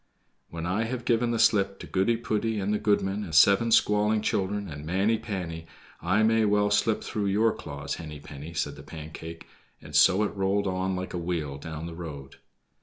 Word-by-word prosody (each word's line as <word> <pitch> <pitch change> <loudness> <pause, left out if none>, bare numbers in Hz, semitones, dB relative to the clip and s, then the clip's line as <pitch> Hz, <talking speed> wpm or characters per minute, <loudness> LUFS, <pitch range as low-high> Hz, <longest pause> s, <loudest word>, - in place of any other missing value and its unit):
"When 85 -1 -5
I 100 +6 0
have 120 +1 -4
given 120 0 +2
the 120 - 0
slip 100 -3 +3
to - - -8
Goody 100 +5 +1
poody, 110 -1 -1
and 100 +2 -1
the 105 - 0
goodman, 105 -1 +1
and 80 -6 -5
seven 100 +8 +5
squalling 105 0 +3
children, 100 0 -1
and 75 -3 -8
Manny 95 +7 +1
panny, 85 -7 -5 0.3
I 95 +5 +2
may 110 0 +3
well 105 -1 +2
slip 105 +1 +2
through 105 -2 -2
your 110 +3 +3
claws, 70 -1 -6
Henny 75 -2 -8
penny," 75 +3 -10
said 75 - -2
the - - -9
Pancake, 80 +2 -9 0.3
and 75 0 -10
so 95 +7 +5
it 105 - -2
rolled 100 +1 +1
on 95 0 -1
like 90 0 -5
a 90 - -2
wheel 80 -5 -3
down 80 +1 -6
the 85 - -6
road. 75 -5 -8
95 Hz, 195 wpm, -27 LUFS, 80-105 Hz, 0.3 s, seven